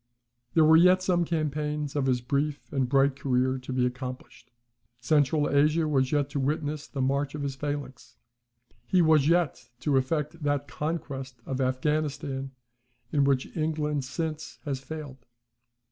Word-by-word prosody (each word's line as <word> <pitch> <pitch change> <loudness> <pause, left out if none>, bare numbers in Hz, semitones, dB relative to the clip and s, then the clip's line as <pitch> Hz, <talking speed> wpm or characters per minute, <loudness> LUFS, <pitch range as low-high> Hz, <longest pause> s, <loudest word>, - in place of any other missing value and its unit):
There 160 -2 +6
were 160 +1 +7
yet 180 +2 +5
some 175 -2 +2
campaigns 150 -2 -2
of 140 -2 +1
his 125 -2 +1
brief 140 +4 -2
and 130 -3 0
bright 135 0 +3
career 130 -1 0
to 130 +1 -8
be 130 -1 +1
accomplished. 125 -1 -6 0.5
Central 145 +3 +2
Asia 150 +3 +3
was 135 -3 +1
yet 145 -2 +2
to 145 - -2
witness 150 +2 -2
the 135 -2 -3
march 140 +2 0
of 145 - -4
his 140 -1 -2
phalanx. 145 -2 -5 0.7
He 180 -2 +4
was 155 -3 +4
yet 170 -1 +1
to 145 -3 +2
effect 150 +4 -1
that 145 -1 0
conquest 140 -4 -4
of 135 - -3
Affghanistan 135 0 -1 0.6
in 140 -2 +3
which 135 -2 0
England 155 -3 -1
since 155 +3 -4
has 140 -3 -2
failed. 135 -2 -8
145 Hz, 150 wpm, -27 LUFS, 135-155 Hz, 0.7 s, were